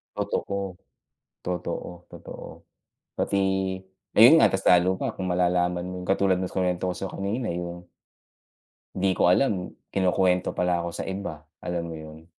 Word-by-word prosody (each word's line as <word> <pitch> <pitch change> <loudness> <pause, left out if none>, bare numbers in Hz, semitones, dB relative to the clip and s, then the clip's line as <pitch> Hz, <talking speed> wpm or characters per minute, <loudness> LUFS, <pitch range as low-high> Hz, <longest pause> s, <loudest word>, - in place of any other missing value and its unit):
Totoo, 100 -2 -3 0.7
totoo, 90 0 -5
totoo. - - -9 0.7
Pati, 100 - 0 0.8
ayon 120 +8 +9
nga, - - +5
mas 95 0 -1
lalo 90 0 +6
pa - - -1
kung 95 - -3
malalaman 90 0 +1
mo 90 - -6
yung 90 - -8
katulad 95 -1 +3
ng 90 0 -2
kinuwento 90 -1 0
ko - - -8
sa 95 - -5
'yo - - -10
kanina, 105 +5 -2
yung 85 0 -5 1.1
di 95 0 +2
ko 90 - +3
alam, 90 -2 +2 0.2
kinukuwento 90 -1 +2
pala 90 -1 +1
ako 85 - -3
sa - - -4
iba, 95 -6 -5 0.2
alam 85 -1 -3
mo 85 - -6
yun? 80 +1 -11
90 Hz, 155 wpm, -26 LUFS, 90-95 Hz, 1.1 s, ayon